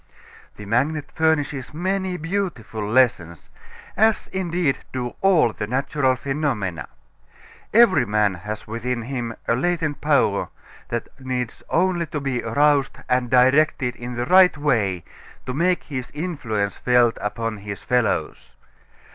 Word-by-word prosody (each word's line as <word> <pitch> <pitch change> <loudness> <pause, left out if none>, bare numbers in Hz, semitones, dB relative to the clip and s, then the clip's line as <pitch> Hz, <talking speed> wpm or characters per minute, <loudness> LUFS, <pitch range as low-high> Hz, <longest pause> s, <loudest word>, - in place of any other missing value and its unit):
The 105 - -10
magnet 145 +7 0
furnishes 150 -4 0
many 185 +1 -1
beautiful 165 - -3
lessons, 90 - +1 0.4
as 220 0 +3
indeed 175 -6 -1
do 125 -2 -4
all 175 - +4
the 105 - -4
natural 130 +2 +1
phenomena. 130 - -2 0.8
Every 190 - +5
man 105 -1 +2
has 105 +4 -7
within 115 +2 -3
him 120 -2 -4
a - - +3
latent 155 +1 -1
power 140 -9 +2 0.4
that 120 0 -3
needs 125 -3 -4
only 175 -1 +1
to 150 - -4
be 135 -3 -2
aroused 140 +4 +2
and 125 -1 +1
directed 130 0 +3
in 120 +1 -7
the 120 +1 -2
right 185 +1 +6
way 105 - 0 0.4
to 125 - -4
make 175 +5 +1
his 130 -4 -5
influence 120 - -2
felt 125 -2 +3
upon 110 +1 -3
his 100 0 -7
fellows. 125 -4 -1
130 Hz, 130 wpm, -22 LUFS, 115-155 Hz, 0.8 s, right